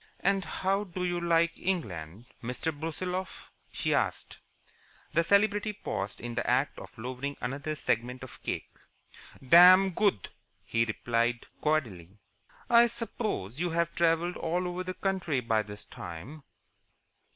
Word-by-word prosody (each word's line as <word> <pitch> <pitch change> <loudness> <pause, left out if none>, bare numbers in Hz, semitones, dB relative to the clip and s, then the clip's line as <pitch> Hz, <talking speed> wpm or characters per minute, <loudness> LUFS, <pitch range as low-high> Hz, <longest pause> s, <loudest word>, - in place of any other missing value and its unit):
"And 195 -1 +2
how 195 +3 -1
do 180 -1 -5
you 175 -1 -1
like 170 0 +2
England, 105 - -3 0.2
Mr. 125 +7 -2
Brusiloff?" 180 +5 -4 0.2
she - - -1
asked. - - -1 0.7
The 165 - +3
celebrity 205 +3 +3
paused 100 - -4
in 120 +1 -5
the - - -1
act - - +1
of - - -12
lowering 130 +4 -4
another 140 +5 -3
segment 125 -1 -1
of 130 - -11
cake. - - -4 0.8
"Dam 185 +5 +9
good," 195 - +1 0.3
he 115 +3 +1
replied, 115 +2 0 0.2
cordially. 105 - -1 0.5
"I 235 -1 +7
suppose 220 - -4
you 175 0 0
have 170 0 0
travelled 170 +1 +1
all 175 +2 -1
over 180 +1 -3
the 185 0 -5
country 185 -8 0
by 115 -3 +1
this 105 0 -9
time?" 120 - -9
165 Hz, 135 wpm, -29 LUFS, 120-185 Hz, 0.8 s, Dam